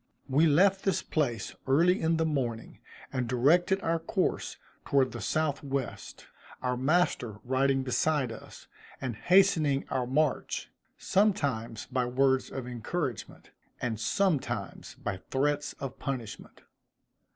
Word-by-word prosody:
We 145 +5 +4
left 190 +6 +4
this 190 -2 +1
place 120 - -1
early 170 +7 +4
in 165 0 +2
the 160 - +1
morning, 125 -7 -3 0.3
and 125 -3 -1
directed 165 +10 +3
our 165 0 +1
course 165 - -1 0.3
toward 135 -2 +2
the - - -6
south 155 -3 -1
west; 140 -2 -5 0.4
our 125 0 0
master 130 - +1
riding 135 +1 +1
beside 135 0 +1
us, 115 - -11 0.3
and 125 -4 -3
hastening 165 - +3
our 125 -2 -1
march, 150 +2 0 0.3
sometimes 140 - 0
by 125 -1 -1
words 130 +1 +2
of 130 -2 -5
encouragement, 125 - -4 0.3
and 115 -3 -2
sometimes 155 - -1
by 95 - -4
threats 145 +2 0
of 135 -1 -7
punishment. 130 -7 -6
135 Hz, 125 wpm, -29 LUFS, 125-160 Hz, 0.4 s, We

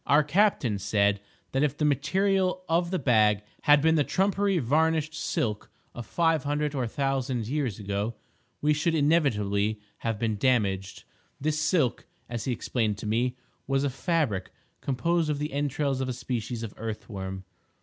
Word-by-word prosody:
Our 150 +2 +5
captain 150 - +2
said 100 0 +1 0.3
that 135 - 0
if 150 -1 +1
the 150 - +1
material 185 +6 +1
of 170 +1 +1
the 185 - 0
bag 110 - +3 0.2
had 145 -1 +6
been 160 0 +5
the 155 -2 +3
trumpery 195 +3 +1
varnished 155 +3 +1
"silk" 110 -8 -2 0.2
of 120 -3 -8
five 165 -4 +2
hundred 145 0 -1
or 130 -4 -1
a - - -2
thousand 130 -2 -1
years 130 -6 -1
ago, 100 +2 -3 0.5
we 150 +1 +3
should 160 +2 +1
inevitably 110 -10 +2 0.2
have 115 -2 -2
been 110 -1 -1
damaged. 100 -6 0 0.4
This 155 +2 0
silk, 155 -7 +1 0.2
as 120 -1 -4
he 130 - 0
explained 115 -2 -1
it - - -19
to - - -6
me, 120 +4 0 0.3
was 135 0 +1
a 140 - 0
fabric 135 - -1 0.3
composed 165 +4 0
of 150 - 0
the 150 -1 -4
entrails 140 -1 -1
of 130 - -2
a - - -1
species 120 -1 -4
of 110 - -6
earth 110 -1 -5
worm. 95 -3 -6
135 Hz, 170 wpm, -27 LUFS, 110-155 Hz, 0.5 s, had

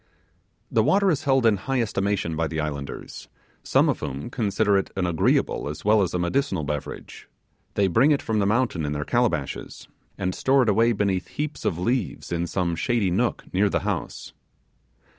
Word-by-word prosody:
The - - +3
water 200 -1 +3
is 155 -1 -2
held 135 -3 +3
in 110 -3 +4
high 135 +6 -2
estimation 100 -6 -1
by 80 +1 0
the 80 0 -4
islanders, 70 -3 -5 0.3
some - - +3
of - - 0
whom 70 - -5
consider 105 -3 +1
it 95 - +1
an 95 -1 0
agreeable 80 -3 +1
as 75 - -8
well 105 0 +5
as 90 -2 -1
a - - +2
medicinal 90 - 0
beverage; 75 -1 -6 0.5
they 100 - +3
bring 115 - +4
it 145 -2 +3
from 110 -2 -1
the 100 - +2
mountain 105 -6 +1
in 75 0 -2
their 75 0 -3
calabashes, - - -1 0.3
and 90 0 -1
store 135 +5 +3
it 115 - +1
away 115 +3 +4
beneath 100 -3 -1
heaps 150 +1 -5
of 85 - 0
leaves 120 +5 -2
in 85 0 -1
some 85 -1 -1
shady 100 +2 0
nook 120 +7 0
near 100 +2 +3
the - - 0
house. - - -4
100 Hz, 185 wpm, -24 LUFS, 85-120 Hz, 0.5 s, well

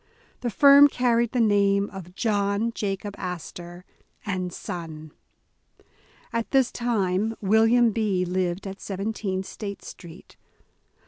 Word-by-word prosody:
The 245 - -2
firm 280 +4 +7
carried 240 -3 +1
the 250 - -1
name 200 -2 +3
of 180 -2 -10
"John 205 +1 0
Jacob 200 -1 -3
Astor 175 0 -7 0.4
and 185 -3 -3
Son". 160 -3 -7 1.2
At 230 -1 -2
this 265 -3 +3
time 220 -2 -1
William 225 +3 +4
B. 205 -4 0
lived 180 +1 -2
at 195 0 -7
17 195 -1 -3
State 200 -1 -7
Street. 170 0 -12
200 Hz, 115 wpm, -25 LUFS, 185-225 Hz, 1.2 s, firm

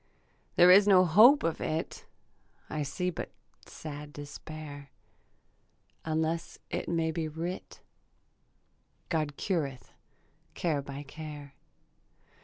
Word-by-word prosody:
There 180 +1 +8
is 200 +2 +8
no 185 -2 +7
hope 220 - +7
of 165 - -1
it; 160 +1 -3 0.6
I 155 - -2
see 180 +6 -2
but - - -5 0.4
sad 150 -1 -8
despair, 145 0 -9 1.1
Unless 160 +1 -1
it - - -3
may 165 -1 +1
be 160 0 -2
writ 165 +4 -6 1.3
God 155 -4 -1
cureth 145 -9 -2 0.6
care 155 -5 0
by 140 +1 -7
care. 145 -1 -9
160 Hz, 100 wpm, -30 LUFS, 145-170 Hz, 1.3 s, There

